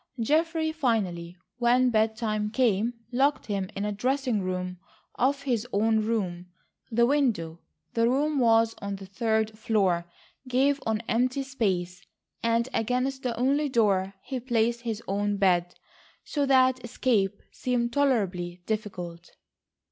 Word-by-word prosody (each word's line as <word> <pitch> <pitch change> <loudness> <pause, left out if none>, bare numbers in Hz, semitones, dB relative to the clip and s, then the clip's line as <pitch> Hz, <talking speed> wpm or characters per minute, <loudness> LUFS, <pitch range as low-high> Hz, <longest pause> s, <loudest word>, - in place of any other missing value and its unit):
Geoffrey 315 +5 +1
finally, 195 - -1 0.2
when 250 +1 +4
bed 220 0 +2
time 215 -2 -1
came, 230 -1 +1 0.2
locked 275 +4 +2
him 195 -3 -2
in 200 - -2
a 210 - -1
dressing 250 +1 0
room 180 -1 -3 0.3
off 275 +2 +1
his 245 -4 -1
own 220 +1 +2
room. 185 -6 -2 0.4
The 235 0 +3
window—the 230 - -1
room 290 +3 +1
was 225 -2 +4
on 200 0 -3
the 195 0 -9
third 220 +2 0
floor—gave 220 +7 0
on 220 -1 0
empty 255 +4 +1
space, 185 -9 -2 0.4
and 230 +1 +1
against 255 +4 0
the 245 -2 -2
only 280 +4 +2
door 195 -5 +2
he 265 -2 -4
placed 235 -1 0
his 230 -2 -4
own 205 +1 0
bed, 180 -3 +2 0.5
so 285 -2 -1
that 260 -1 +4
escape 215 -4 0
seemed 240 -2 -1
tolerably 185 -11 0
difficult. 180 -6 -5
225 Hz, 130 wpm, -27 LUFS, 195-255 Hz, 0.5 s, when